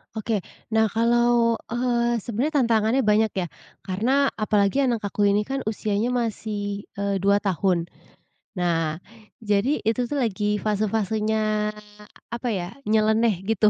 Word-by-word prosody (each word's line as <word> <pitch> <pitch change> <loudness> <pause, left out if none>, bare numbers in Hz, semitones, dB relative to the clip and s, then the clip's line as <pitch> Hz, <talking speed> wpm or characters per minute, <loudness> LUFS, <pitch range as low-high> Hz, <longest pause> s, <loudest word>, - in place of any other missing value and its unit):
Oke, 220 -1 -1 0.3
nah, 220 0 +3
kalau, 235 +1 +2
eee, 240 -2 0
sebenarnya 265 +5 0
tantangannya 230 +3 +2
banyak, 215 0 +3
ya, 185 -2 -1 0.4
karena 255 +9 +1
apalagi 210 +3 +2
anak 235 -4 -1
aku 205 0 +1
ini, 205 +1 +3
kan, 270 +4 -3
usianya 215 0 -1
masih, 210 -4 -3
eee, 200 -1 -1
2 200 +2 +3
tahun, 185 -2 +1 0.7
nah, 165 -3 -1 0.4
jadi 215 +7 +1
itu, 230 +3 0
tuh, 280 +3 -2
lagi 210 -2 0
fase-fasenya 215 0 0 0.6
apa, 240 +1 -4
ya, 180 +2 -5
nyeleneh 220 -2 +2
gitu. 215 -1 +4
215 Hz, 125 wpm, -24 LUFS, 200-235 Hz, 0.7 s, gitu